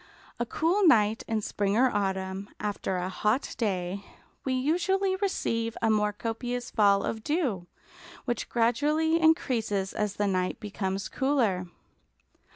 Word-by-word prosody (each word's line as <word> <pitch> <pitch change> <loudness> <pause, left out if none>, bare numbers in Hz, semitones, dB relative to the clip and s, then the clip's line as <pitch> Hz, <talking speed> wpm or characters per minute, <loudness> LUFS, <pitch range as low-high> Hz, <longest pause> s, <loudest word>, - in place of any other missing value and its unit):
A 240 - -1
cool 355 - +2
night 220 -5 +4
in 220 -1 0
spring 200 +1 0
or 255 +1 +4
autumn, 190 0 -2
after 205 -2 -2
a 180 0 -2
hot 210 +7 0
day, 195 -3 -1 0.4
we 265 - -1
usually 360 +8 +1
receive 230 - -1
a 225 - +2
more 210 -1 +2
copious 240 +3 -4
fall 200 -2 +4
of 220 -1 -3
dew, 255 - -1 0.6
which 240 -3 -2
gradually 300 +8 +2
increases 225 - +1
as 210 -1 -2
the 205 - 0
night 185 -2 0
becomes 195 -2 -3
cooler. 230 -10 +1
220 Hz, 135 wpm, -28 LUFS, 200-265 Hz, 0.6 s, night